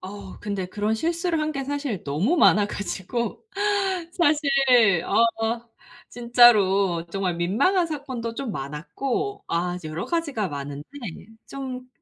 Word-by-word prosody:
어 195 0 -9
근데 200 -3 -3
그런 210 +3 -1
실수를 335 +6 -1
한 310 0 -1
게 275 -1 -3
사실 280 - -3
너무 170 - 0
많아 210 -10 +5
가지고. 210 +2 -4 0.7
사실 300 -4 +2 0.6
어 230 0 +1 0.4
진짜로 200 -8 +4
정말 185 0 -2
민망한 280 - +2
사건도 260 -7 -5
좀 260 -1 -4
많았고 240 - -4
아 175 +1 -1
이제 170 -3 -7
여러 155 +3 -4
가지가 290 - -1
많은데. 145 -1 -6 0.6
좀 255 -2 -7
225 Hz, 245 characters per minute, -24 LUFS, 185-275 Hz, 0.7 s, 많아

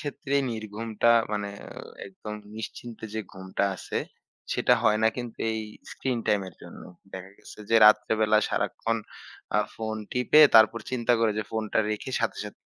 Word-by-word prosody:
ক্ষেত্রেই 140 -1 -1
নির্ঘুমটা 110 +1 -1 0.2
মানে 105 -1 -2 0.2
অ - - -9 0.3
একদম 105 +2 -8 0.2
নিশ্চিন্তে 110 +1 -8
যে 110 - -1
ঘুমটা 95 +1 -3
আছে, - - -6 0.6
সেটা - - +3
হয় 105 - +3
না 110 - +5
কিন্তু 120 -2 -6
এই 110 0 -2 0.3
স্ক্রিন 130 -3 -2
টাইমের 95 -4 0
জন্য। - - -11 0.3
দেখা 95 0 -8
গেছে - - -14
যে 115 - +5
রাত্রেবেলা 110 0 +4
সারাক্ষণ 115 0 -1 0.6
আ - - +4 0.2
ফোন 110 -1 -4 0.2
টিপে 125 +5 +4
তারপর 110 +1 +6
চিন্তা 120 -1 +1
করি 115 -1 +3
যে, - - 0
"ফোনটা 110 -1 -2
রেখে 105 +5 -4
সাথে, 115 - -1
সাথে 105 - -10
110 Hz, 155 wpm, -26 LUFS, 105-115 Hz, 0.6 s, তারপর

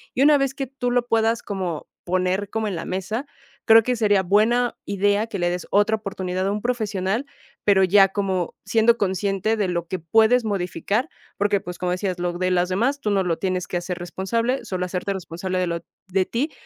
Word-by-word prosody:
Y 265 - +3
una 295 0 +6
vez 270 -1 0
que 275 -1 -3
tú 255 -1 -3
lo 245 -1 +2
puedas 225 0 +1
como 185 -6 -4 0.2
poner 185 +2 0
como 220 -1 -2
en 200 - -3
la 165 - -4
mesa, 215 +8 -3 0.4
creo 225 0 +7
que 250 +2 0
sería 205 -4 +3
buena 225 +6 +2
idea 205 +2 +1
que 210 -3 -5
le 175 -1 0
des 180 0 -4
otra 205 +2 +3
oportunidad 185 -3 -3
a - - +1
un 210 0 -2
profesional, 220 0 -1 0.4
pero 195 -2 +4
ya 195 +1 +6
como 190 -3 -2
siendo 225 +2 +3
consciente 195 +1 0
de 210 -3 0
lo 170 -1 -2
que 185 0 -3
puedes 225 +8 +3
modificar 205 - -1 0.3
porque 205 0 +2
pues 180 0 -7
como 180 -1 -2
decías 185 0 -2
lo 175 0 -1
de 185 0 +1
las 180 0 +1
demás, 245 +10 0
tú 210 - 0
no 195 - +2
lo 170 -2 -1
tienes 185 -1 -2
que 180 - -2
hacer 175 0 -4
responsable, 230 +9 -2
solo 180 -1 -2
hacerte 180 +2 -2
responsable 185 0 -4
de 180 - 0
lo 170 0 -2 0.3
de 190 0 +1
ti, 270 - -2
200 Hz, 210 wpm, -23 LUFS, 185-225 Hz, 0.4 s, creo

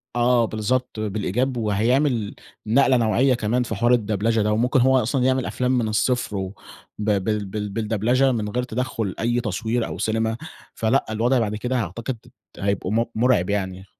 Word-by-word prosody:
آه 120 -1 +3
بالضبط، 110 +2 -2
بالإيجاب، 110 +5 -1
وهيعمل 115 +2 +1 0.3
نقلة 130 +3 +4
نوعية 120 +4 +3
كمان 120 +2 0
في 110 -2 -4
حوار 120 +4 +3
الدبلچة 110 0 +1
ده، 105 +1 +1
وممكن 125 +4 +2
هو 130 +1 +4
أصلًا 125 +3 0
يعمل 130 -1 +2
أفلام 125 0 -1
من 115 -3 0
الصفر 110 0 0
وب 95 0 -4 0.5
بال 105 0 0
بال 105 +1 -4
بالدبلچة 110 +4 0
من 110 -4 -2
غير 125 +4 -1
تدخل 120 -5 -3
أي 120 +2 +1
تصوير 115 +2 -1
أو - - -6
سينما، 110 +1 0 0.4
فلأ 115 +5 +1
الوضع 120 +4 +2
بعد 105 -2 -1
كده 125 +4 -2
أعتقد 115 +5 -4 0.4
هيبقوا 100 -1 -1
م 115 +2 +2
مرعب 110 -5 +2
يعني. 95 -2 -2
115 Hz, 165 wpm, -23 LUFS, 105-125 Hz, 0.5 s, نقلة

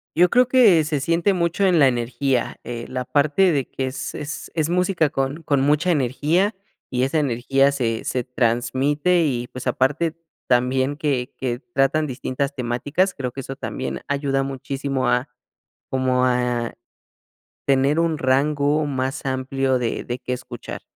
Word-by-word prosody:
Yo 175 +2 +5
creo 250 +3 +4
que 225 -11 +5
se 150 -2 -1
siente 170 +6 +2
mucho 175 +2 +1
en 180 -2 +4
la 140 -3 +6
energía, 125 +1 -1
eh, 120 -1 -5
la 130 0 -4
parte 150 +8 +3
de 140 -5 0
que 135 - -3
es 130 0 -5
es 150 +1 -6
es 155 -2 +1
música 180 -3 +2
con 135 +4 -2
con 140 -3 +1
mucha 150 +6 +2
energía 155 - +1 0.3
y 125 -1 0
esa 135 +4 +1
energía 135 +1 +2
se 115 -5 -1
se 125 - -1
transmite 130 +8 +1
y, 125 -4 -1
pues, 130 +1 -7
aparte, 150 +5 +1 0.3
también 130 +3 +1
que 135 -5 -1
que 120 -2 -2
tratan 150 0 0
distintas 135 +1 -3
temáticas, 140 +9 0
creo 130 -3 -4
que 135 - -6
eso 135 +1 -7
también 130 -1 -5
ayuda 140 -1 0
muchísimo 135 0 -3
a, 125 +2 +1 0.6
como 130 -1 +1
a 125 -2 0 0.9
tener 140 +3 +3
un 165 -2 +1
rango 145 +3 +2
más 135 +1 -3
amplio 130 0 0
de 120 -2 -2
de 120 - -4
qué 125 - -4
escuchar. 125 - -7
135 Hz, 160 wpm, -22 LUFS, 130-155 Hz, 0.9 s, la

